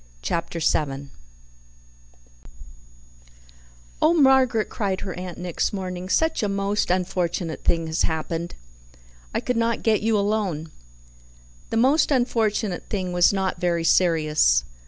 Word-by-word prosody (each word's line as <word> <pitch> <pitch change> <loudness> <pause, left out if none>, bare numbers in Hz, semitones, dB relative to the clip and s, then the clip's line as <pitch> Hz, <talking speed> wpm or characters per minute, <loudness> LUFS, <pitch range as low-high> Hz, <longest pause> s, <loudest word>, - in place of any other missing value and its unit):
Chapter 170 - -2
7 140 -3 -1 2.9
"Oh, 320 +2 +4
Margaret," 265 -6 +4
cried 195 -5 -3
her 190 -2 -5
aunt 180 -1 -7
next 180 +2 -2
morning, 185 -2 -5
"such 320 +8 +1
a 210 - 0
most 200 +1 -1
unfortunate 175 -2 -1
thing 165 -1 +1
has 160 +1 -2
happened. 165 +1 -2 0.8
I - - -1
could 250 - -2
not 230 0 0
get 220 -2 +2
you 220 0 +2
alone." 200 -7 -1 1.0
The 225 - -1
most 270 +7 +3
unfortunate 225 -7 0
thing 185 -3 -2
was 175 0 +5
not 190 -3 -2
very 170 -2 0
serious. 155 - +3
185 Hz, 120 wpm, -23 LUFS, 170-220 Hz, 2.9 s, was